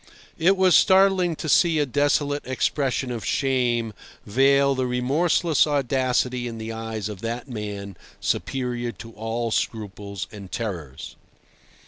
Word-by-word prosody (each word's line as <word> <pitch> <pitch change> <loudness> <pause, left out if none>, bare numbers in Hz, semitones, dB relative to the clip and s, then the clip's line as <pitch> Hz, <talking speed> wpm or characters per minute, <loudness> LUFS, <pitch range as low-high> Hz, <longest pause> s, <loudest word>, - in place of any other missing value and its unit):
It 190 +4 +4
was 185 -1 +4
startling 190 -3 +4
to 155 - -6
see 165 +2 +4
a 150 - +2
desolate 145 +1 +1
expression 130 0 -1
of 115 -3 -4
shame 120 -2 0 0.3
veil 140 +5 +4
the 130 -1 -1
remorseless 150 +6 +2
audacity 130 -3 0
in 115 -1 -6
the 110 0 -5
eyes 110 -2 -4
of 105 -3 -8
that 115 +3 -4
man 105 -5 -6 0.2
superior 120 -2 -2
to 115 - -11
all 115 +1 -3
scruples 100 -3 -3
and 100 -3 -10
terrors. 85 - -5
125 Hz, 130 wpm, -24 LUFS, 110-145 Hz, 0.3 s, It